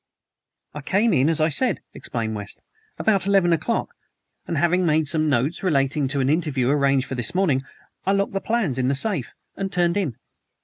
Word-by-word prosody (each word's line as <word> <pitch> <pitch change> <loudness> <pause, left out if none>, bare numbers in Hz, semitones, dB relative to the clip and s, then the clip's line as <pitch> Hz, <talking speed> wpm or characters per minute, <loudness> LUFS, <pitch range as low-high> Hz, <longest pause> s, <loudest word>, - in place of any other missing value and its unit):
"I 150 - -6
came 205 +8 +2
in, 135 0 +3
as 165 - 0
I 155 +1 +3
said," 245 - 0
explained 110 -2 -4
West, 105 -1 -7 0.4
"about 200 -4 +1
eleven 195 -4 +4
o'clock 165 +9 -1 0.5
and 170 - -2
having 175 +4 +2
made 155 -2 +2
some 155 +1 +1
notes 140 +4 0
relating 140 -4 +1
to 140 +1 -1
an 130 - +1
interview 145 -5 +1
arranged 140 -2 +2
for - - -6
this 120 +4 -4
morning, 165 -9 +2 0.4
I 195 - +1
locked 200 0 0
the 195 - -1
plans 215 - 0
in 125 - +1
the 140 - +1
safe 175 - -2 0.2
and 195 -1 -3
turned 175 0 +1
in." 165 - -1
155 Hz, 190 wpm, -23 LUFS, 135-190 Hz, 0.5 s, eleven